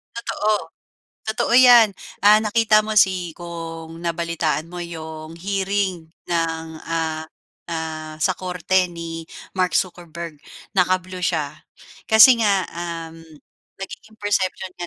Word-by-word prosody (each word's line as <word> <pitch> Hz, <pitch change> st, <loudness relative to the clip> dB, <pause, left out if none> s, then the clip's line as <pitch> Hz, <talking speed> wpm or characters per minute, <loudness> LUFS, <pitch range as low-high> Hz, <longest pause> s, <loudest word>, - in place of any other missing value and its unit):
Totoo. 215 Hz, -2 st, -1 dB, 0.5 s
Totoo 235 Hz, +2 st, -1 dB
'yan. 240 Hz, -4 st, +8 dB, 0.3 s
Ah, 210 Hz, +1 st, +8 dB
nakita 215 Hz, 0 st, +3 dB
mo 215 Hz, 0 st, -4 dB
si 185 Hz, -4 st, +3 dB
kung 165 Hz, -1 st, -7 dB
nabalitaan 170 Hz, -2 st, -1 dB
mo 175 Hz, +1 st, -8 dB
yung 160 Hz, -1 st, -8 dB
hearing 190 Hz, -2 st, -1 dB, 0.2 s
ng, 165 Hz, -1 st, -1 dB, 0.2 s
ah, 160 Hz, -1 st, -2 dB, 0.5 s
ah, 160 Hz, -1 st, -4 dB
sa 185 Hz, +4 st, +2 dB
korte 180 Hz, +1 st, 0 dB
ni 165 Hz, -1 st, -6 dB, 0.3 s
Mark 185 Hz, -3 st, +1 dB
Zuckerberg, 170 Hz, -3 st, -4 dB, 0.3 s
naka-blue 185 Hz, 0 st, +1 dB
siya. 155 Hz, -5 st, -1 dB, 0.6 s
Kasi 230 Hz, +2 st, +8 dB
nga, 200 Hz, -3 st, +3 dB
um, 165 Hz, -1 st, -6 dB, 0.6 s
nagiging 215 Hz, +3 st, -9 dB
perception 190 Hz, -2 st, -1 dB
'yan 175 Hz, -, -3 dB
175 Hz, 115 wpm, -22 LUFS, 165-200 Hz, 0.6 s, yan